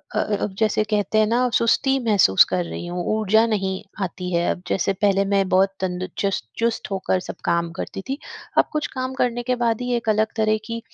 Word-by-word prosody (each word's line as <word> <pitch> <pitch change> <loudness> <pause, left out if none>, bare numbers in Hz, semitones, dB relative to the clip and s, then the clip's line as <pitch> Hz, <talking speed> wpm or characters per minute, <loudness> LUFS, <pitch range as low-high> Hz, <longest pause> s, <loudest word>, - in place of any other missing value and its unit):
अ, - - +2 0.2
अब 205 - -2
जैसे 215 -1 +2
कहते 210 0 0
हैं 215 - +4
ना 245 +3 +2
सुस्ती 265 +4 +3
महसूस 195 - +6
कर 180 - -1
रही 170 - -6
हूँ 175 0 -3 0.2
ऊर्जा 220 +2 +4
नहीं 190 -4 -1 0.2
आती 180 0 -4
है, 170 0 +1
अब 180 - -5
जैसे 195 +1 0
पहले 200 0 +2
मैं 195 -1 +1
बहुत 195 +1 +3
तंद 185 0 -2
चुस 195 - 0 0.2
चुस्त 230 -2 -1
होकर 190 -1 0
सब - - -5
काम 170 0 +1
करती - - -5
थी 270 - -1 0.4
अब - - +6
कुछ 305 -1 -1
काम 255 0 -3
करने 245 -2 -1
के 250 +1 0
बाद 230 0 +1
ही 250 - -2
एक 230 -2 -2
अलग 215 0 +1
तरह 215 0 +2
की 230 0 -4
210 Hz, 215 wpm, -22 LUFS, 190-230 Hz, 0.4 s, महसूस